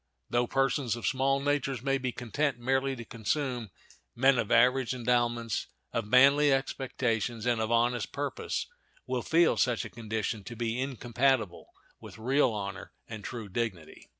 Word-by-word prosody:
Though 120 0 +2
persons 135 -3 +1
of 120 - -6
small 135 0 +2
natures 140 -3 -1
may 135 0 +1
be 130 -1 -2
content 125 +3 -1
merely 135 +2 0
to 115 -2 -8
consume, 120 +1 -2 0.5
men 130 +1 +4
of 110 - -1
average 125 +1 +4
endowments, 120 -2 0 0.3
of 115 -2 -2
manly 140 +5 +6
expectations, 120 -4 -1
and 120 -2 +1
of 110 - -1
honest 120 -1 +1
purpose 145 -1 -3 0.4
will - - -2
feel 165 +1 +3
such 125 -3 +1
a - - -8
condition 110 -1 -3
to 120 - -7
be 115 +2 -2
incompatible 125 -5 0 0.3
with - - -11
real 130 +4 +2
honor 100 -3 -5
and 110 -3 -8
true 115 -4 -6
dignity. 95 -6 -5
120 Hz, 150 wpm, -29 LUFS, 115-135 Hz, 0.5 s, manly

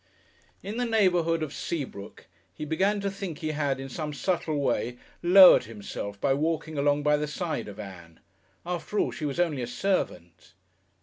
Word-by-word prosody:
In 205 +4 -5
the 245 - 0
neighbourhood 175 -7 +2
of 150 -1 -5
Seabrook 130 -11 -6 0.3
he 155 - -5
began 190 +7 +1
to 200 0 -1
think 195 -5 -6
he 155 - -3
had, 145 -3 -1
in 135 - -6
some 150 +3 -5
subtle 160 -2 -1
way, 125 -3 -1 0.2
lowered 185 +2 +8
himself 100 -2 -7
by 135 - +2
walking 155 +2 -1
along 145 0 +1
by 150 0 +3
the 150 0 -2
side 155 -5 -3
of 105 0 -9
Ann.... 85 -5 -10 0.5
After 180 +4 -4
all, - - +2
she 155 - -5
was 140 +2 -3
only 160 -7 +1
a 120 - -3
servant. 90 - -3
150 Hz, 175 wpm, -27 LUFS, 130-175 Hz, 0.5 s, lowered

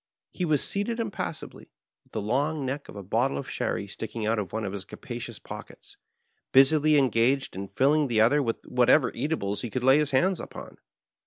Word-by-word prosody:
He 180 - -2
was 155 -3 +2
seated 215 +4 -2
impassively, 220 -4 -5 0.3
with - - -33
the 110 - -3
long 140 +6 0
neck 140 +2 -4
of - - -10
a 100 - -7
bottle 80 -6 0
of 70 - -5
sherry - - -2
sticking 115 -2 -5
out 110 +1 +1
of 95 -4 -4
one 110 0 -3
of 95 - -4
his 100 -2 -5
capadons 120 0 -8
pockets, - - -11 0.6
bnsily 150 +3 +5
engaged 130 0 +2
in 100 +1 -5
filling 140 +8 +2
the 115 -3 +1
other 120 +7 +4
with 115 -4 -3
whatever 125 0 +3
eatables 105 -10 -2
he 120 - -4
could 125 +4 -3
lay 135 +3 +6
his 150 -1 +1
hands 175 +7 +2
upon. - - -9
130 Hz, 190 wpm, -27 LUFS, 110-150 Hz, 0.6 s, lay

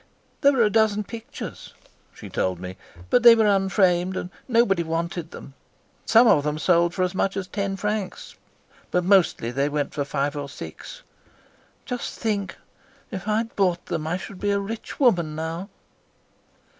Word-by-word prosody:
"There 280 0 +5
were 250 -3 +3
a 210 - +3
dozen 215 -1 +2
pictures," 225 +2 -9 0.4
she - - -11
told 90 -2 -1
me, 90 0 -7 0.4
"but 245 - +5
they 235 -1 +9
were 220 -1 +3
unframed, 190 -2 +2
and 180 - -5 0.2
nobody 230 -7 +3
wanted 165 0 -3
them. 140 - -11 0.5
Some 230 +2 +6
of 150 -10 +5
them 150 0 -1
sold 170 +1 +2
for 185 - +1
as 180 0 -1
much 195 +1 0
as 195 - -2
ten 200 -1 -2
francs, 210 0 -4 0.6
but 180 - +1
mostly 180 - +3
they 140 +3 0
went 145 -1 -2
for 145 - -1
five 140 +1 -2
or 145 -1 -5
six. - - -9 0.8
Just 245 -2 -5
think, 205 -3 -2 0.5
if 190 +1 -6
I 215 0 +2
had 225 +1 -3
bought 180 -3 +1
them 160 -2 -3
I 175 +3 -1
should 190 0 -9
be 205 - -1
a 200 0 +2
rich 215 +3 -6
woman 175 - +3
now." 165 +5 -4
190 Hz, 170 wpm, -24 LUFS, 165-210 Hz, 0.8 s, they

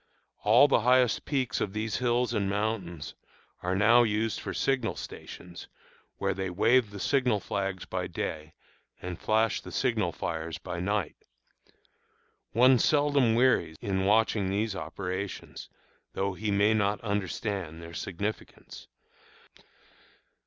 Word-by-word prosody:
All 120 +7 +6
the - - +3
highest 125 +1 +3
peaks 135 -5 -1
of 95 - -2
these 110 0 -2
hills 120 0 +1
and 100 -3 0
mountains 100 -6 -3 0.5
are 90 +1 -1
now 110 +5 +6
used 110 -1 0
for - - -5
signal 135 -1 0
stations, 90 -1 -9 0.5
where 100 0 0 0.2
wave 115 +5 +3
the 100 0 -9
signal 130 -4 +2
flags 95 -2 -3
by - - -3
day 80 0 -5 0.4
and 90 -2 -6
flash 110 0 +1
the - - -10
signal - - 0
fires 80 -1 -4
by 85 - -6
night. 100 -1 -1 1.3
One 125 +2 +5
seldom 145 -6 +3
wearies 115 -10 +2
in 95 -4 -1
watching 105 -1 +2
these 105 +1 -1
operations, 95 +1 -5 0.4
though 100 0 -1
he 105 +3 -3
may 100 +2 +3
not 105 -1 +1
understand 100 -4 -3
their 85 0 -10
significance. 100 +3 -6
105 Hz, 125 wpm, -28 LUFS, 95-115 Hz, 1.3 s, All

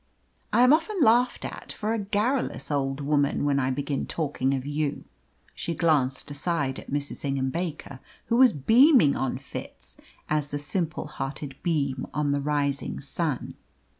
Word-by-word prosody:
I 245 - +5
am 250 +3 +7
often 335 +6 +1
laughed 245 -2 +3
at - - -7
for 215 +1 -2
a 230 - -1
garrulous 210 - -1
old 135 -1 -1
woman 145 0 +1
when 140 -1 +2
I 130 -1 +1
begin 140 +1 -2
talking 140 -4 -1
of 130 0 -4
you!" 145 0 -2 0.5
She 170 - -3
glanced 145 -5 +1
aside 145 -2 -1
at - - -12
Mrs. 145 0 -3
Ingham 135 -2 -1
Baker, 155 -5 -5 0.3
who 235 - +1
was 255 -2 +7
beaming 225 - +5
on 130 -1 -1
Fitz, 135 - -9 0.3
as 150 -1 0
the 145 - -2
simple 155 +3 -2
hearted 135 -1 -6
beam 140 -6 -1
on 150 -1 +1
the 140 0 0
rising 145 -1 -1
sun. 145 0 -3
145 Hz, 160 wpm, -26 LUFS, 140-175 Hz, 0.5 s, am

